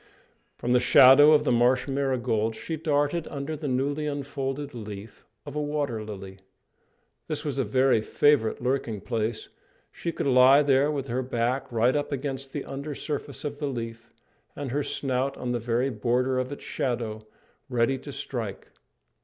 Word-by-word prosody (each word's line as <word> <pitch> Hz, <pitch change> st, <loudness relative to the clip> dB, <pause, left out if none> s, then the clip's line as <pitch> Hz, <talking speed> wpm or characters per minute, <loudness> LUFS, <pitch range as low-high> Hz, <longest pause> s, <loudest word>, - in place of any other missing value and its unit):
From 125 Hz, -, 0 dB
the 125 Hz, -, +5 dB
shadow 135 Hz, +4 st, +8 dB
of 150 Hz, -1 st, +5 dB
the 150 Hz, -, +1 dB
marsh 125 Hz, +2 st, +3 dB
marigolds 125 Hz, -5 st, 0 dB
she 165 Hz, -, -4 dB
darted 155 Hz, +1 st, 0 dB
under 140 Hz, +2 st, -4 dB
the 150 Hz, 0 st, -5 dB
newly 140 Hz, +3 st, -1 dB
unfolded 140 Hz, 0 st, -4 dB
leaf 105 Hz, -2 st, -9 dB, 0.2 s
of -, -, -8 dB
a 150 Hz, -, 0 dB
water 145 Hz, -7 st, -2 dB
lily. 95 Hz, -2 st, -8 dB, 0.9 s
This 155 Hz, 0 st, -4 dB
was 140 Hz, -2 st, -2 dB
a -, -, +3 dB
very 130 Hz, +1 st, +3 dB
favourite 120 Hz, -1 st, +2 dB
lurking 125 Hz, -5 st, -1 dB
place; 115 Hz, -2 st, -3 dB, 0.4 s
she 170 Hz, -, -4 dB
could -, -, -4 dB
lie 135 Hz, +2 st, +6 dB
there 140 Hz, +1 st, +3 dB
with 140 Hz, -3 st, -2 dB
her 125 Hz, +1 st, -1 dB
back 125 Hz, +1 st, -1 dB
right 120 Hz, +3 st, +2 dB
up 145 Hz, 0 st, -1 dB
against 135 Hz, -1 st, -4 dB
the 145 Hz, -, -4 dB
under 140 Hz, +2 st, -5 dB
surface 145 Hz, -1 st, -5 dB
of 145 Hz, -1 st, -5 dB
the 145 Hz, -, -2 dB
leaf, 115 Hz, -3 st, -6 dB, 0.4 s
and 140 Hz, -3 st, -5 dB
her 145 Hz, +3 st, 0 dB
snout 135 Hz, -1 st, -1 dB
on 125 Hz, -, -3 dB
the 120 Hz, -, 0 dB
very 120 Hz, +3 st, 0 dB
border 125 Hz, +3 st, 0 dB
of 130 Hz, +2 st, -3 dB
its 145 Hz, -, -7 dB
shadow, 115 Hz, -4 st, -3 dB, 0.5 s
ready 125 Hz, +2 st, +1 dB
to 145 Hz, -, -9 dB
strike. 115 Hz, -7 st, -5 dB
130 Hz, 170 wpm, -26 LUFS, 120-145 Hz, 0.9 s, shadow